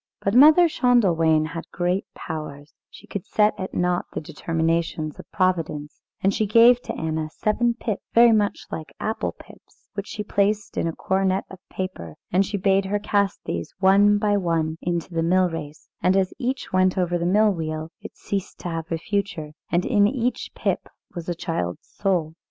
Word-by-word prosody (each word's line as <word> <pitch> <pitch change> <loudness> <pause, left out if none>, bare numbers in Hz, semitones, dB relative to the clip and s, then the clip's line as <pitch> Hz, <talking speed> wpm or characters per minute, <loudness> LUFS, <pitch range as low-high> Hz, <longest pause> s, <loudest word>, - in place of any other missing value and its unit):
But 200 - -1
Mother 310 +7 +8
Schändelwein 175 - +3
had 165 0 -7
great 180 +2 -1
powers; 150 -2 -7 0.2
she - - -14
could 200 - -5
set 210 0 +2
at 185 - -5
naught 180 0 +1
the - - -2
determinations 160 0 -2
of - - -12
Providence; 165 -6 -1 0.2
and 195 +1 +3
she 215 - 0
gave 235 +3 +6
to - - -6
Anna 160 -1 -2
seven 235 +7 0
pips, 225 -4 -3
very 235 0 +7
much 210 -2 +1
like 155 - -7
apple 220 +1 -2
pips, - - -18
which 200 0 -5
she 210 - -5
placed 205 +1 0
in - - 0
a - - 0
cornet 190 0 0
of 190 - -10
paper; 185 - -6 0.2
and 185 +2 +4
she 200 +1 -3
bade 195 0 +2
her 200 +2 0
cast 205 -1 0
these 85 0 -4
one 200 +2 +5
by 205 -1 +2
one 165 -3 -1
into 170 0 -3
the 165 - 0
mill 180 +2 +3
race, 155 -2 -7
and 185 +1 +3
as 190 -1 +1
each 255 -3 -3
went 185 0 +3
over 175 -1 +1
the - - -2
mill 210 +3 +4
wheel, 155 -2 -4
it - - -10
ceased 200 -1 -4
to 175 - -4
have 165 0 -5
a 165 - 0
future, 190 -4 -3 0.2
and 175 +1 +1
in 205 -4 +4
each 245 +1 -2
pip - - -2 0.2
was 170 0 -6
a 175 - -1
child's 165 - -4
soul. 175 -6 -1
185 Hz, 185 wpm, -23 LUFS, 165-205 Hz, 0.2 s, Mother